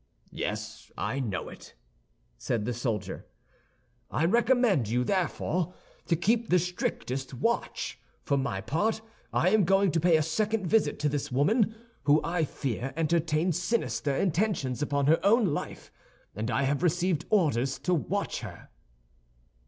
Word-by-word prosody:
"Yes, - - -5
I 140 - -2
know 105 -9 -3
it," - - -12 0.6
said 110 -3 -1
the 125 - -1
soldier. 115 -4 -3 0.8
"I 160 - 0
recommend 230 - +3
you 125 +2 +1
therefore 180 +1 -1 0.3
to 170 - +3
keep 225 +7 +1
the 180 - +5
strictest 135 -7 -3
watch. 230 - -2 0.2
For 140 - +1
my 130 -8 -1
part 215 - -1 0.3
I 180 - +3
am 215 -1 +4
going 195 +1 +3
to 165 - +1
pay 170 0 +4
a 155 - +1
second 210 +6 0
visit 220 +4 +2
to 150 - +2
this 145 -2 -3
woman, 210 - +2 0.3
who 150 +1 +5
I 165 -1 0
fear 135 -2 -4
entertains 165 +1 +1
sinister 185 -10 0
intentions 170 - 0
upon 140 -1 0
her 160 +4 +3
own 220 +3 +5
life, - - -6 0.4
and 110 +4 -3
I 140 - +1
have 140 +2 0
received 175 -1 +1
orders 140 - +2
to 180 - -1
watch 195 +5 -1
her." - - -10
165 Hz, 145 wpm, -28 LUFS, 140-195 Hz, 0.8 s, the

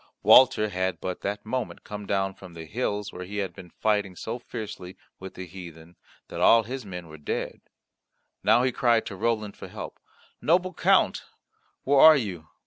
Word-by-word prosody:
Walter 125 -5 +6
had 95 -1 -2
but 90 -1 -5
that 105 +1 -4
moment 125 +1 -4
come 105 -1 -8
down 95 -1 0
from 95 -2 -13
the 80 -1 -8
hills 105 +1 -3
where 90 - -7
he 100 +3 -7
had 95 -3 -2
been 90 +1 -12
fighting 105 -1 -1
so 115 +6 -5
fiercely 105 -6 -8 0.2
with 95 0 -9
the 95 - -7
heathen 85 -2 -11 0.3
that - - -6
all 115 0 +6
his 130 +3 -6
men 90 -4 -8
were 80 -1 -12
dead; 75 - -4 0.8
now 110 +4 +4
he 130 - +2
cried 120 -2 +2
to 100 - -6
Roland 110 0 -1
for - - -9
help. - - -8 0.4
"Noble 180 +3 +2
Count, - - +2 0.6
where 140 0 +3
are 160 +1 +9
you? 90 - -5
100 Hz, 180 wpm, -26 LUFS, 90-115 Hz, 0.8 s, are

